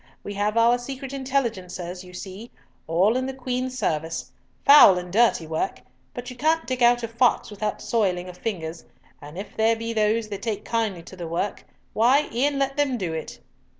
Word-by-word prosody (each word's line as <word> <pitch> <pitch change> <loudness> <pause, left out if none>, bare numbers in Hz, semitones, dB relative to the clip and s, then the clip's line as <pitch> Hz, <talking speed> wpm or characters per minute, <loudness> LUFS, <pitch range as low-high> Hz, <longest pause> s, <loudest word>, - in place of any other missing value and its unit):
"We 205 - -5
have 205 +2 -1
our 235 +2 +4
secret 270 +1 -7
intelligencers, 205 -10 -3
you 180 - -13
see, 190 +5 -8 0.4
all 185 +8 +3
in 260 0 0
the 265 - -5
Queen's 255 0 -3
service. 155 - -2 0.3
Foul 280 -10 +9
and 180 0 -6
dirty 225 -6 +3
work, 155 -5 -3 0.3
but 245 +1 -6
you - - -9
can't 315 +6 +1
dig 255 -1 -3
out 240 0 +5
a - - -1
fox 235 0 +1
without 210 0 -3
soiling 185 -6 0
of 180 - -9
fingers, 170 -6 -4 0.4
and 150 +3 -10
if 200 +2 -7
there 225 +1 +3
be 230 +1 -4
those 215 0 +1
that 200 -2 -5
take 215 -3 -3
kindly 220 -7 -1
to 185 - -12
the 175 -2 -6
work, 170 +5 -3 0.3
why, 260 +7 +4
e'en 280 +4 +1
let 275 0 -1
them 280 -4 +1
do 180 -6 -3
it." 160 -1 -6
220 Hz, 190 wpm, -24 LUFS, 180-250 Hz, 0.4 s, Foul